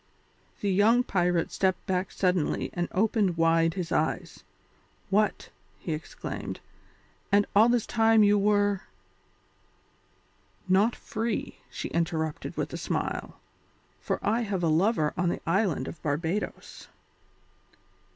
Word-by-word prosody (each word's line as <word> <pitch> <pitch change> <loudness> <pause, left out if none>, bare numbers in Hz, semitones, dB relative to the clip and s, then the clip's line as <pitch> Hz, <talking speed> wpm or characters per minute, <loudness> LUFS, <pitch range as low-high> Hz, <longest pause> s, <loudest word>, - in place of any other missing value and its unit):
The 200 - 0
young 220 +6 +4
pirate 180 -5 0
stepped 190 -1 0
back 185 0 -1
suddenly 180 -4 0
and 175 0 -1
opened 200 -3 +1
wide 165 0 +3
his 180 -3 -4
eyes. - - -1 0.7
"What!" 210 +1 +1 0.3
he 165 - -4
exclaimed, 155 +1 -6 0.7
"and 200 0 +4
all 220 +3 +6
the 240 -1 +3
time 225 -1 +3
you 205 0 +5
were 205 -1 +2 0.9
" 95 0 -37
"Not 195 +5 +3
free," 225 -1 -4
she - - -5
interrupted 160 -2 -2
with - - -3
a - - -3
smile, - - -3 0.6
"for - - -2
I 225 +4 +2
have 200 -5 -2
a 165 - +3
lover 160 -1 +2
on 180 -2 +1
the - - -3
island 170 -7 +1
of 160 - -8
Barbadoes." 160 +7 -3
190 Hz, 125 wpm, -27 LUFS, 165-210 Hz, 0.9 s, all